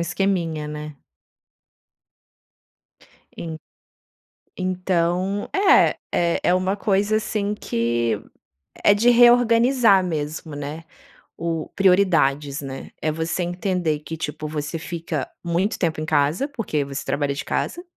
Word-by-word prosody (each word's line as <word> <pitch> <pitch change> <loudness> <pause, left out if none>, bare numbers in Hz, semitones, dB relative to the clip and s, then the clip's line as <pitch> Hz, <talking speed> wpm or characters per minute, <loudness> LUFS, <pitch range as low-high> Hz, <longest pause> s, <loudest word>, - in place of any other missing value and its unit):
esqueminha, 170 -4 -1
né? 150 -1 -7 2.4
En 160 -2 -6 1.0
Então, 185 +1 -1
é 390 +1 +5 0.2
é 170 -1 +1
é 180 - +3
uma 185 +2 0
coisa 205 +1 +1
assim 210 -2 -1
que 115 - -1 0.6
é 205 - +6
de 235 +4 +4
reorganizar 240 -2 +5
mesmo, 155 -2 -4
né. 145 +3 -6 0.5
O 165 -1 -3
prioridades, 160 -8 +2
né. 135 -1 -7
É 155 - 0
você 165 +3 -2
entender 175 -3 -1
que, 160 +2 -7
tipo, 155 0 -4
você 150 +1 -4
fica 165 -5 -4
muito 175 +5 0
tempo 165 -3 0
em 155 - -3
casa, 155 - +1
porque 220 - -2
você 140 0 -5
trabalha 140 +1 -1
de 145 +3 -5
casa. 350 - -2
170 Hz, 115 wpm, -22 LUFS, 150-195 Hz, 2.4 s, é